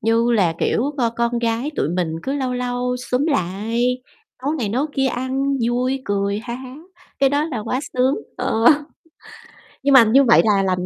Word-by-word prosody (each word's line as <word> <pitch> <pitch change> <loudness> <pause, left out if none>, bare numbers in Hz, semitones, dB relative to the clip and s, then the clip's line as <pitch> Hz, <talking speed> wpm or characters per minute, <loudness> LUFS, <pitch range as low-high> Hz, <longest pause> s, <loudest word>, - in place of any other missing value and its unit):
như 230 +2 +2
là 190 -7 +2
kiểu, 265 +5 0
c - - 0 0.2
con 235 0 0
gái 235 +4 -1
tụi - - 0
mình 170 -2 -2
cứ 270 - -3
lâu 260 -3 -2
lâu 250 0 -2
xúm 250 +3 -1
lại, 235 - -1 0.4
nấu 290 - 0
này 245 -9 -2
nấu 255 +8 0
kia 270 -2 +1
ăn 265 +2 -1
vui 255 +2 -1
cười 200 0 -1
ha 235 +2 -6
há, 260 +1 -9 0.4
cái 275 - +4
đó 290 +1 +1
là 295 -7 -4
quá 255 +5 -2
sướng, 255 +2 +2 0.2
ờ. 225 +1 -1 1.2
Nhưng 280 0 +3
mà 260 -3 +9
như 240 +5 +5
vậy 235 -3 +6
là 200 -3 +3
lành 185 -1 -1
245 Hz, 190 wpm, -20 LUFS, 220-265 Hz, 1.2 s, mà